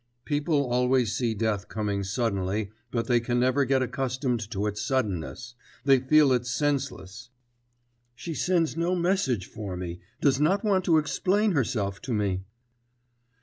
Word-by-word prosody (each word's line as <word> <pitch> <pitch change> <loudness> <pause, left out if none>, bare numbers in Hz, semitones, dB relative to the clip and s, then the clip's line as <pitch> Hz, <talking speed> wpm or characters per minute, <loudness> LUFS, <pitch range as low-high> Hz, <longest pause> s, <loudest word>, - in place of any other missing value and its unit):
People 145 -1 +1
always 125 -1 +2
see 115 -3 0
death 105 -2 -1
coming 105 -2 -2
suddenly, 100 -1 -1 0.2
but 115 -1 -1
they 120 -1 +3
can 120 +1 -1
never 130 +3 +2
get 130 0 +2
accustomed 125 0 -1
to 105 -2 -2
its 105 0 -2
suddenness, 125 - -2 0.3
they 135 -2 +6
feel 145 +2 +4
it 125 -1 0
senseless. 125 -5 -2 0.9
'She 165 +7 -6
sends 165 0 +1
no 170 +2 0
message 170 - +1
for 100 -4 -6
me, 90 -1 -5 0.2
does 135 -2 +3
not 185 +8 +2
want 190 -3 +2
to 165 -2 +4
explain 195 +7 +1
herself 110 - -1
to 125 -3 -2
me.... 100 -3 0
125 Hz, 150 wpm, -27 LUFS, 105-145 Hz, 0.9 s, they